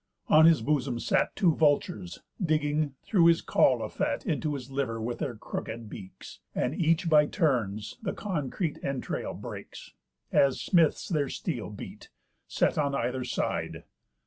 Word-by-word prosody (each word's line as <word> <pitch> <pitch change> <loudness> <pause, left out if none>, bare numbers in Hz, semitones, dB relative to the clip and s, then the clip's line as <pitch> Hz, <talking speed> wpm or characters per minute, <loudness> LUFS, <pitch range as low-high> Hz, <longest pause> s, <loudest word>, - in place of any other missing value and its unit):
On 155 +1 +7
his 160 -8 +4
bosom 135 -3 0
sat - - +1
Two 175 -5 +3
vultures, 140 - 0 0.2
digging, 150 -3 0
through 175 -5 +4
his 170 -1 +4
caul - - +3
of - - -6
fat, - - -1
Into 155 -5 -1
his 135 -1 -8
liver 130 -5 -2
with 120 +2 -3
their 135 -6 -3
crookéd 110 +1 -6
beaks; 95 -3 -10 0.2
And 125 - 0
each 165 +1 +1
by 150 -2 +5
turns 120 - -1
the - - -2
concrete 165 - -3
entrail 135 -2 -3
breaks - - -9 0.4
(As 135 -2 +3
smiths 170 -5 +2
their 150 -6 0
steel - - -4
beat) - - -10 0.4
set - - +1
on 140 -2 +1
either 125 +1 -1
side. 125 - -2
145 Hz, 150 wpm, -28 LUFS, 125-160 Hz, 0.4 s, On